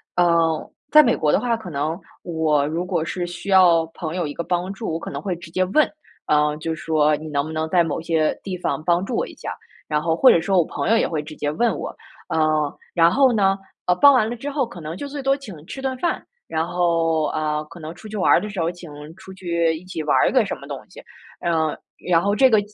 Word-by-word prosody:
呃， 165 -2 +2 0.2
在 305 - +9
美 240 -6 +2
国 150 -1 +2
的 - - +3
话， 235 -2 0
可 190 -6 -9
能 155 +4 -2 0.2
我 155 -4 +1
如 165 +4 -2
果 180 -3 -1
是 175 +2 -3
需 175 +3 -7
要 180 -4 +6
朋 160 0 -5
友 175 -4 -1
一 145 - -5
个 170 - -4
帮 180 +2 -1
助， 195 -3 -4
我 165 - -2
可 - - -7
能 - - -5
会 190 -3 -3
直 170 -1 -11
接 185 +3 0
问， 300 +12 +3 0.4
嗯， 150 0 +2
就 160 +1 -3
说： 155 -2 +2
“你 155 +1 -8
能 140 -1 0
不 155 - -7
能 160 0 -2
在 175 0 +4
某 165 - -2
些 160 -2 0
地 190 -2 -4
方 165 -3 -2
帮 175 +2 +2
助 235 - -3
我 - - 0
一 - - -11
下？” - - -6 0.4
然 150 -1 +1
后 165 0 +1
或 260 +9 +6
者 - - +6
说 185 +3 +2
我 170 - +3
朋 - - -4
友 225 - +5
也 - - +2
会 155 -3 -3
直 155 +1 -10
接 145 - -2
问 230 +11 +1
我。 - - -6 0.3
呃， 155 -2 +1 0.2
然 165 -1 +5
后 265 +6 +4
呢， 195 -3 +3 0.3
呃， 180 - +4
帮 285 +9 +7
完 225 -4 +3
了 240 - -3
之 280 +5 -5
后 275 -4 0
可 180 - -11
能 160 0 -6
就 285 - -6
最 280 0 -6
多 270 +1 +3
请 200 - -11
吃 265 +8 -7
顿 265 -1 -2
饭， 345 +6 -1 0.2
然 160 +1 -1
后， 165 -2 +1
呃， 155 -1 -1
可 170 - -11
能 160 +1 -8
出 220 - -11
去 215 - -7
玩 185 - +3
儿 - - +6
的 210 - -5
时 200 -2 -6
候 165 - +1
请 175 -3 -12 0.2
出 190 0 -12
去 170 -3 0
一 160 - -9
起 170 -4 -5
玩 150 - +2
儿 - - +4
个 - - +3
什 - - -3
么 - - -12
东 - - -5
西， - - -13 0.4
嗯， 160 -2 0 0.3
然 170 -2 +4
后 200 +3 +1
这 265 +4 +6
个 215 - +6
170 Hz, 280 characters per minute, -22 LUFS, 160-195 Hz, 0.4 s, 在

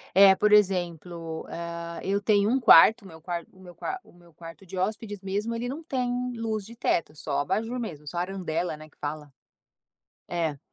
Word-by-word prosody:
É 195 0 +8
por 210 +2 +2
exemplo, 175 -4 +1
ah, 170 0 -6
eu 200 +1 0
tenho 205 0 +3
um 265 +2 +2
quarto, 225 0 +8
o 195 - -11
meu 160 -2 -13
quanto 170 +1 -5
o - - -19
meu 180 -2 -13
qua 380 0 -4
o - - -20
meu 175 -2 -20
quarto 165 +2 -12
de 190 +1 -8
hóspedes 205 +1 -2
mesmo, 205 +4 -2
ele 245 +2 -3
não 310 +5 -6
tem 250 -3 -1
luz 220 -3 -3
de 230 +3 -11
teto, 170 -8 0
só 150 -2 -2
abajur 215 +11 -1
mesmo, 150 -11 -6
só 175 - -5
a - - +1
arandela, 180 -3 -2
né, 155 0 -12
que - - -31
fala. 150 -1 -5 1.0
É, 160 -5 -1
185 Hz, 200 wpm, -27 LUFS, 165-215 Hz, 1.0 s, É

